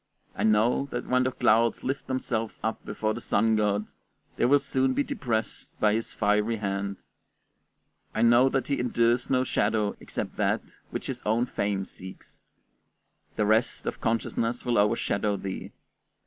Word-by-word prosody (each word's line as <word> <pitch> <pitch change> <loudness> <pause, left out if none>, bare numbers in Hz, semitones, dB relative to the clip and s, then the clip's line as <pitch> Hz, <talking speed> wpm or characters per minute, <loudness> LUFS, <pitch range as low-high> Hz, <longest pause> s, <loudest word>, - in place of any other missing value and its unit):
I - - -5
know 110 +5 +3
that 120 - -4
when 125 0 +2
the 130 - +1
clouds 115 -1 +2
lift 135 +2 -3
themselves 115 -4 -2
up 110 - -2
before 110 0 -2
the 120 - -6
sun 110 +1 +2
god, 105 -1 +1 0.5
they - - +1
will 140 +4 +6
soon 135 -2 0
be 145 - +2
depressed 110 -5 -3
by 105 -1 +3
his 115 +1 -2
fiery 105 +2 +1
hand; 100 -1 -3 1.2
I 110 - +2
know 120 +3 +6
that 130 -2 -1
he 140 - 0
endures 120 0 +1
no 130 -1 +3
shadow 105 -3 0
except - - -5
that - - +1 0.3
which - - -5
his - - -4
own 115 +3 +2
fame 100 -5 -2
seeks; 95 0 -13 0.9
the 105 - +1
rest 110 +3 +1
of - - -4
consciousness 115 +1 -1
will 120 -3 +2
overshadow 100 0 +1
thee. 95 -1 -6
115 Hz, 160 wpm, -27 LUFS, 105-125 Hz, 1.2 s, will